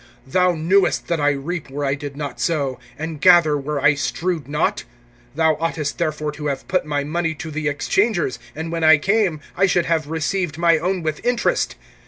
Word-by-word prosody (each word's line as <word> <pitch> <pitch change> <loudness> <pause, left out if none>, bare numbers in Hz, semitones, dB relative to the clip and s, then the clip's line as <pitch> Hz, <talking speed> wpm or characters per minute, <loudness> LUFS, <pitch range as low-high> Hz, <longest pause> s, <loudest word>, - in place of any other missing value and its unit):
Thou 180 +6 +2
knewest 175 +5 +1
that 170 -2 0
I 145 - +4
reap 145 +3 -3
where 145 +2 -3
I 135 - +1
did 145 -1 -6
not 145 -2 -5
sow, 140 -6 -1 0.2
and 160 -1 -5
gather 175 -5 +6
where 145 +1 -2
I 145 +2 +5
strewed 165 +2 -2
not? 150 +2 0 0.5
(27)Thou 160 -2 +3
oughtest 160 -3 -2
therefore 155 -2 -1
to 150 0 -5
have 140 -2 -3
put 185 -4 0
my 145 -1 -1
money 165 +2 -2
to 160 0 -7
the 155 0 -2
exchangers; 170 - 0 0.2
and 160 +2 -5
when 165 -1 -2
I 155 -1 +7
came, 190 -2 +1
I 195 - +3
should 175 -2 +2
have 160 -3 0
received 160 +1 -2
my 170 -1 +4
own 180 +1 -1
with 155 -1 -3
interest. 245 -1 0
160 Hz, 195 wpm, -21 LUFS, 145-175 Hz, 0.5 s, I